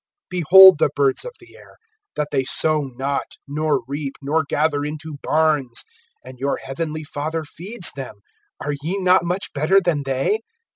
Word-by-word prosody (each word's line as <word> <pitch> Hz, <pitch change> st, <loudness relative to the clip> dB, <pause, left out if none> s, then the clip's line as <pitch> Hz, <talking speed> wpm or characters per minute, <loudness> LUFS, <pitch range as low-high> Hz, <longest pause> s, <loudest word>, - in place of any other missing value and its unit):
(26)Behold 185 Hz, +1 st, +8 dB
the -, -, +3 dB
birds 140 Hz, -1 st, +1 dB
of -, -, -7 dB
the -, -, -18 dB
air, -, -, -17 dB, 0.4 s
that 150 Hz, -1 st, -2 dB
they 135 Hz, -2 st, +1 dB
sow 155 Hz, +3 st, +2 dB
not, 140 Hz, +2 st, -3 dB
nor 145 Hz, -2 st, -1 dB
reap, 140 Hz, 0 st, -4 dB
nor 150 Hz, +3 st, 0 dB
gather 150 Hz, -1 st, 0 dB
into 150 Hz, 0 st, -6 dB
barns; 150 Hz, -5 st, 0 dB, 0.4 s
and 130 Hz, -1 st, -12 dB
your 140 Hz, +1 st, -1 dB
heavenly 155 Hz, +3 st, -5 dB
Father 155 Hz, +2 st, -4 dB
feeds 180 Hz, +6 st, -2 dB
them. 135 Hz, -5 st, -8 dB, 0.4 s
Are 145 Hz, -, -3 dB
ye 170 Hz, +7 st, -2 dB
not 185 Hz, -1 st, +3 dB
much 180 Hz, +3 st, -2 dB
better 155 Hz, +7 st, +3 dB
than 170 Hz, -6 st, 0 dB
they? 135 Hz, -, 0 dB
150 Hz, 160 wpm, -21 LUFS, 140-165 Hz, 0.4 s, 26)Behold